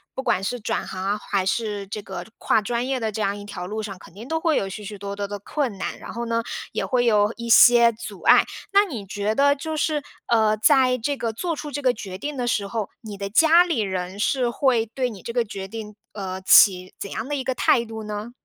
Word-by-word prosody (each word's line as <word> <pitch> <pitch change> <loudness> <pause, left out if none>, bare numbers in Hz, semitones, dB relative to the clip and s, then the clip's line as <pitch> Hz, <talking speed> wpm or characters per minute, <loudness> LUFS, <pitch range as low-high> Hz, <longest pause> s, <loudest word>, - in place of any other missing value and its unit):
不 265 - -4
管 185 - +1
是 245 +4 -3
转 - - -2
行 185 0 -5
啊， 200 +2 0
还 195 -2 -1
是 205 -1 -2
这 210 +2 -5
个 190 -3 -7
跨 220 - +2
专 235 +4 -2
业 265 -2 -1
的 220 -1 -1
这 215 +1 -4
样 200 0 0
一 205 - -8
条 205 -3 -7
路 215 +2 -4
上， 195 -3 -7
肯 185 - -15
定 210 +5 -10
都 320 0 0
会 320 -2 +1
有 195 - 0
许 210 +2 -8
许 205 0 -7
多 200 0 -6
多 200 0 -4
的 205 0 -5
困 245 0 -3
难， - - -4
然 - - -9
后 235 - -4
呢， 230 0 0 0.3
也 - - -2
会 250 -1 +1
有 210 -1 +3
一 235 0 -6
些 235 0 +7
阻 225 0 -9
碍。 - - +6 0.3
那 400 +1 +5
你 240 - -6
觉 205 +2 -2
得 285 +2 +4
就 315 +3 -4
是， 305 -1 0 0.3
呃， 220 -2 +3
在 255 +2 +4
这 280 +4 -2
个 230 -3 -2
做 335 +9 -2
出 300 -1 -6
这 290 0 -4
个 255 -2 +3
决 190 -4 -7
定 290 +8 -5
的 245 -1 -2
时 210 -4 0
候， 215 0 -3
你 210 -3 -8
的 200 0 -4
家 325 - +6
里 330 -10 0
人 190 -1 -3
是 245 +4 +1
会 240 -2 +2
对 250 +3 -2
你 205 -5 -10
这 235 - -6
个 240 -1 +2
决 200 -3 -7
定， 215 0 -8 0.2
呃， 190 -2 -5
起 185 -1 +6
怎 200 - -7
样 220 - -4
的 290 - -2
一 270 - -3
个 260 0 -1
态 240 -1 +3
度 225 -1 -7
呢？ 210 +2 -5
220 Hz, 275 characters per minute, -23 LUFS, 200-255 Hz, 0.3 s, 些